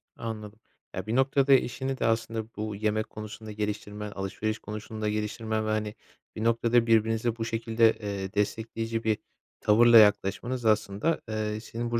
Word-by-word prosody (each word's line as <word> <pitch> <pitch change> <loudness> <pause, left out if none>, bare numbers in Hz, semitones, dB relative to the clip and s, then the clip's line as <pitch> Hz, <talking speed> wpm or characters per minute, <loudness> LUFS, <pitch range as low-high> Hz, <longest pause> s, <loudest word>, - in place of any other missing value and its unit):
Anladım. 110 -1 -6 0.4
Ya, 95 +3 -5
bir 115 - -1
noktada 135 +1 +4
eşini 130 +1 +1
de - - -1
aslında 115 -1 0
bu 105 -1 -4
yemek 110 +1 -1
konusunda 110 0 -8
geliştirmen, 105 0 -4
alışveriş 100 +3 -3
konusunda 105 +1 -5
geliştirmen 110 +1 -2
ve, 110 - -2
hani, 110 0 -1 0.4
bir 110 - -4
noktada 115 0 +3
birbirinize 115 +1 +2
bu 115 -1 -3
şekilde, 115 0 +2
eee, 100 -3 -5
destekleyici 115 +2 -2
bir 110 -1 +1 0.4
tavırla 115 +2 +6
yaklaşmanız 110 +4 +3
aslında, 110 +7 +1
eee, 110 0 -2
senin 115 +1 -5
bu 115 - +1
110 Hz, 150 wpm, -28 LUFS, 105-115 Hz, 0.4 s, tavırla